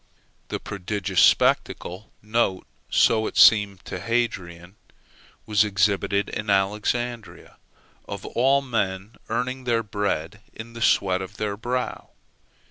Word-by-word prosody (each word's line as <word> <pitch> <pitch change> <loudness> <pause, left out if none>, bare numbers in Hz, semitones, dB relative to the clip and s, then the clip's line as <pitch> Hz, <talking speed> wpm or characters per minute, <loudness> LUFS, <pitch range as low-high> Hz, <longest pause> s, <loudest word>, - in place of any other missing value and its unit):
The - - -4
prodigious 100 -1 -2
spectacle 95 +5 +2 0.8
(so 110 -1 +3
it - - -6
seemed 105 -3 +5
to 90 - -6
Hadrian) 95 -6 -3 0.7
was 105 -1 +3
exhibited 100 0 +1
in 105 0 -5
Alexandria, 105 +4 -1 0.5
of 100 -1 -7
all 135 +3 +2
men 100 -4 -3
earning 130 +1 -3
their 115 -2 +1
bread 105 -2 -3
in 115 +1 -10
the 115 - -9
sweat 95 -4 +2
of 95 +3 -8
their 105 -1 -2
brow. 125 +4 -4
105 Hz, 115 wpm, -24 LUFS, 95-115 Hz, 0.8 s, seemed